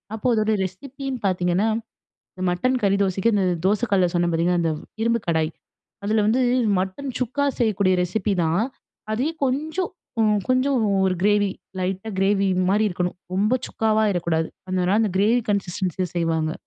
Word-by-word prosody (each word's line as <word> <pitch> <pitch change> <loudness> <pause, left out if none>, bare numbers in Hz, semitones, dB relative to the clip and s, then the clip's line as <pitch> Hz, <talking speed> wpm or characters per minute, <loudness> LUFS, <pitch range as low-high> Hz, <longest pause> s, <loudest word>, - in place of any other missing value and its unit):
அப்போ 220 +3 -2
அதோட 215 0 +1
ரெசிப்பின்னு 265 +7 -5
பார்த்தீங்கன்னா, 180 +2 +1 0.7
இந்த 185 - -6
மட்டன் 255 +9 +1
கறி 200 0 +3
தோசைக்கு 195 +4 +1
இந்த 195 -2 +2 0.2
தோசக்கல்ல 200 -3 +2
சொன்னேன் 175 -1 +1
பார்த்தீங்களா, 175 +2 +2
அந்த 165 -1 +1 0.3
இரும்பு 235 0 +1
கடாய். 160 -1 +1 0.5
அதில 215 +1 +2
வந்து 240 +4 +3 0.4
மட்டன் 190 +9 -3
சுக்கா 260 +3 0
செய்யக்கூடிய 200 -5 +2
ரெசிப்பி 200 +3 -1
தான். 165 +6 +1 0.5
அதே 255 +8 0 0.2
கொஞ்சம் 310 +7 -1 0.3
உ - - +4 0.3
கொஞ்சம் 255 +2 +2
உ - - +1 0.2
ஒரு 185 - 0
கிரேவி 205 -1 +3 0.3
லைட்டா 190 +3 -2
கிரேவி 195 0 +2 0.2
மாரி 210 +3 +3
இருக்கணும். 180 -1 -2 0.2
ரொம்ப 205 +5 +2
சுக்காவாயிறக்கூடாது 195 -7 +1 0.2
அதனால 185 0 +1
அந்த 220 - +2
கிரேவி 220 +5 +3
கன்சிஸ்டன்ஸில 185 -2 -1
செய்வாங்க. 165 -2 0
200 Hz, 145 wpm, -23 LUFS, 180-225 Hz, 0.7 s, உ